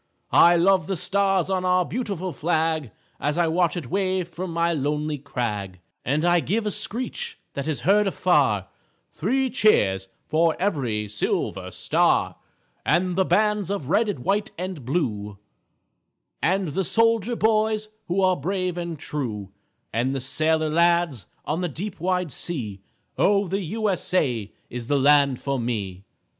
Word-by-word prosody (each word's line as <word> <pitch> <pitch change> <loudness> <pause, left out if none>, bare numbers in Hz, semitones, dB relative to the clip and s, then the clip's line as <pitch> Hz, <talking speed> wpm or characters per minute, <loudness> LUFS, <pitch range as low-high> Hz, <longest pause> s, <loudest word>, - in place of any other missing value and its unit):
I 175 0 +7
love 180 -1 +3
the 195 - -1
stars 195 +1 +1
on 185 -1 0
our 180 0 +3
beautiful 195 -7 -3
flag 160 -2 0 0.3
As 150 +2 -1
I 175 - +3
watch 170 0 +1
it 140 -8 -6
wave 185 -2 0
from 175 +1 -6
my 170 +1 +1
lonely 150 0 -1
crag, 105 -8 -4 0.2
And 150 +5 0
I 175 0 +4
give 215 +7 -1
a 210 - 0
screech 255 - -2 0.2
that 140 +1 -4
is 155 -3 -2
heard 200 +7 +3
afar, 140 - +2 0.5
Three 260 - 0
cheers 95 - +3 0.2
for 160 +1 +2
every 125 - -1
silver 105 +1 -2
star, - - +1 0.5
And 180 +2 +1
the 190 0 +2
bands 210 -2 +2
of 195 -10 -3
red 210 +4 +3
and 135 -12 -5
white 200 +1 +1
and 180 -5 -5
blue, 105 - -2 1.0
And 190 -1 +1
the 190 +7 -1
soldier 230 +3 +2
boys 215 -1 +1 0.2
who 185 +2 0
are 185 -1 +4
brave 180 +2 -2
and 170 -2 -4
true, 120 - -4 0.4
And 125 +5 0
the - - -1
sailor 155 +4 +1
lads 170 - +2 0.2
on 160 +4 -1
the 180 - -1
deep 185 +7 -6
wide 180 -1 0
sea, 115 - -3 0.4
Oh, 200 0 +3
the 195 +3 -1
U. 215 +5 -2
S. 190 -3 -1
A. 120 - 0 0.2
is 120 -1 -6
the 145 - +2
land 140 -1 +4
for 140 -2 -2
me! 100 -6 -3
170 Hz, 155 wpm, -24 LUFS, 140-195 Hz, 1.0 s, I